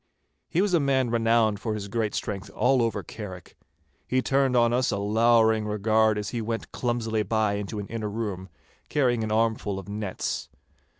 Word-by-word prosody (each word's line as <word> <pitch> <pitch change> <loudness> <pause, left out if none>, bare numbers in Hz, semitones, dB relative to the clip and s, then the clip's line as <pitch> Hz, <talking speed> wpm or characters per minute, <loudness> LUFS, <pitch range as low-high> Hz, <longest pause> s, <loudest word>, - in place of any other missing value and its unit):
He 180 - +2
was 205 -3 0
a 170 - +5
man 135 -4 +1
renowned 115 -2 +2
for 110 -1 -2
his 100 -1 -5
great 110 0 -1
strength 100 -2 -4
all 130 0 +3
over 115 -3 -1
Carrick. 95 -5 -9 0.5
He 130 0 +1
turned 135 -2 +2
on 120 0 +4
us 130 +2 +2
a 100 - 0
lowering 110 +1 +3
regard 110 +1 +2
as 105 -1 -3
he 120 - -2
went 115 +1 -4
clumsily 115 -3 -1
by 110 0 +1
into 105 +1 -4
an 100 - -4
inner 110 0 -4
room, 100 -4 -4 0.4
carrying 125 -5 +1
an 110 - -3
armful 110 -2 0
of 95 - -8
nets. 105 -2 -4
110 Hz, 180 wpm, -26 LUFS, 105-120 Hz, 0.5 s, a